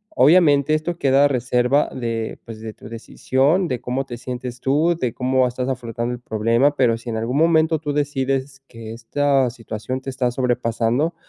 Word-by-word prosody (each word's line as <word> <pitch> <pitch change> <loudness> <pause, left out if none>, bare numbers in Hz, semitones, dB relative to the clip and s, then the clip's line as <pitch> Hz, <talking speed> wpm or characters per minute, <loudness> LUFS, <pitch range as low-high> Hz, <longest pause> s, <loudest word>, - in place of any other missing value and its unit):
Obviamente 150 0 +5
esto 170 +2 -3
queda 135 +1 +4
a - - +6
reserva 125 +2 +1
de, 115 -3 -3
pues 110 -2 -9
de 110 -1 -7
tu - - -13
decisión, 135 +9 0
de 125 -2 -3
cómo 130 +2 -2
te 120 -3 -7
sientes 125 0 -6
tú, 155 +6 +2
de 125 -3 -1
cómo 130 0 +1
estás 125 +1 -4
afrontando 120 -2 -3
el 120 - -6
problema, 115 +6 +1
pero 120 -4 +2
si 120 - -8
en 110 - -2
algún 115 +5 -2
momento 160 0 +3
tú 145 -1 -3
decides 135 -1 -2
que 115 -1 -9
esta 135 +3 +1
situación 115 +2 -6
te 135 - -6
está 130 -1 0
sobrepasando, 125 +4 0
130 Hz, 180 wpm, -21 LUFS, 120-145 Hz, -, a